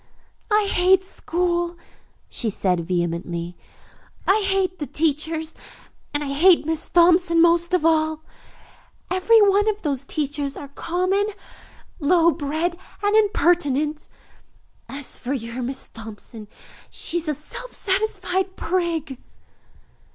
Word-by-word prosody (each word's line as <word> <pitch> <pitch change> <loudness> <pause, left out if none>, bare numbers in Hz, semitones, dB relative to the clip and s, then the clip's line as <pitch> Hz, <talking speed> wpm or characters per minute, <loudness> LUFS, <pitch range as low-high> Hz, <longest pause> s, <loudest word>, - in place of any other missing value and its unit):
"I 420 -1 +3
hate 375 0 +3
school," 345 -1 -2 0.5
she 230 - 0
said 185 -3 0
vehemently. 170 -1 -2 0.7
"I 410 +2 +3
hate 380 -1 0
the 295 - -4
teachers, 315 +1 -1 0.6
and 290 0 -1
I 275 -1 -3
hate 340 +3 +5
Miss 320 0 -2
Thompson 345 0 +4
most 340 +1 +4
of 345 - 0
all. 315 -1 +2 0.9
Every 370 +5 +5
one 405 +1 +4
of 425 0 -3
those 280 -4 -1
teachers 285 -1 -2
are 285 - -8
common, 365 +7 0 0.7
low 335 +2 +4
bred 320 +4 -2 0.2
and 410 +1 +2
impertinent. 330 -8 +2 0.8
As 275 0 -7
for 255 +3 -3
your 235 -1 -4
Miss 260 +2 -4
Thompson, 220 0 -11 0.4
she 345 - -4
is 330 - -8
a 300 - 0
self 485 - -8
satisfied 380 -2 -1
prig." 330 -6 -2
330 Hz, 120 wpm, -22 LUFS, 280-370 Hz, 0.9 s, hate